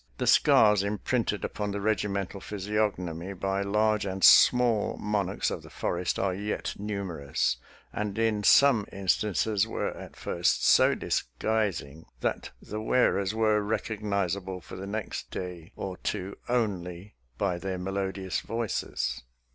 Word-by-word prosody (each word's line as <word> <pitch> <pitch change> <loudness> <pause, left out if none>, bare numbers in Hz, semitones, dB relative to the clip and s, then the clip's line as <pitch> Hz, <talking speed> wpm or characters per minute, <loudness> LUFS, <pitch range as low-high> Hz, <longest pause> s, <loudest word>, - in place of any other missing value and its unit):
The - - -1
scars 105 -2 +5
imprinted 105 +2 -1
upon 105 -1 -3
the 100 0 -3
regimental 100 -2 -1
physiognomy 100 -4 -2
by 95 +1 -1
large 105 +1 +1
and 95 -1 -4
small 120 -4 +6
monarchs 100 -2 -1
of - - -4
the - - -13
forest 90 +1 -2
are 95 -2 0
yet 105 +3 -3
numerous, 100 -9 -2 0.4
and 105 -1 -3
in 110 -2 +1
some 115 0 +5
in 95 0 -8
stances 105 +1 +2
were - - -2
at - - -10
first - - 0
so - - +6
disguising 80 - -2
that - - -2
the 105 +1 -6
wear 120 -2 +3
ers 100 +2 -2
were 110 -1 +3
recognizable 100 -3 -2
for - - -11
the 95 +1 -6
next 110 +1 -4
day 90 0 -6
or 95 -2 -5
two 100 -1 -3
only 100 -5 -2 0.2
by 90 0 0
their 95 0 -3
melodious 95 0 -2
voices. 105 - -3
100 Hz, 140 wpm, -28 LUFS, 95-105 Hz, 0.4 s, small